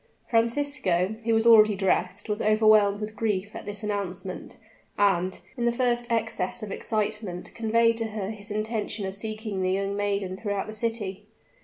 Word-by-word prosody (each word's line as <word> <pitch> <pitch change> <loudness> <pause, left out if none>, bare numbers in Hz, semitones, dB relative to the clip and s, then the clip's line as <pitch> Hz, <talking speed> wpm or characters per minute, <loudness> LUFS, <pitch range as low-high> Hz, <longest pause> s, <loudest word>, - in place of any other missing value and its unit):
Francisco, 230 -6 +1
who 230 - +2
was 225 +1 +2
already 215 -2 +7
dressed, 190 -1 0
was 210 -1 -2
overwhelmed 215 -1 +4
with 215 0 -5
grief 210 -2 -1
at - - -8
this 205 +1 -6
announcement, 190 -3 -4 0.4
and, 190 -2 +2
in 240 - -2
the 235 - +4
first 240 -1 0
excess 225 -2 -1
of 210 - -5
excitement, 210 -4 -3
conveyed 230 0 +2
to 225 - -1
her 210 -2 -4
his 210 0 -7
intention 215 -1 -2
of 190 - -4
seeking 215 -1 -4
the 185 - +1
young 195 +1 -1
maiden 200 -2 -1
throughout 200 0 -2
the 215 - -7
city. 210 -3 -3
210 Hz, 165 wpm, -26 LUFS, 195-225 Hz, 0.4 s, already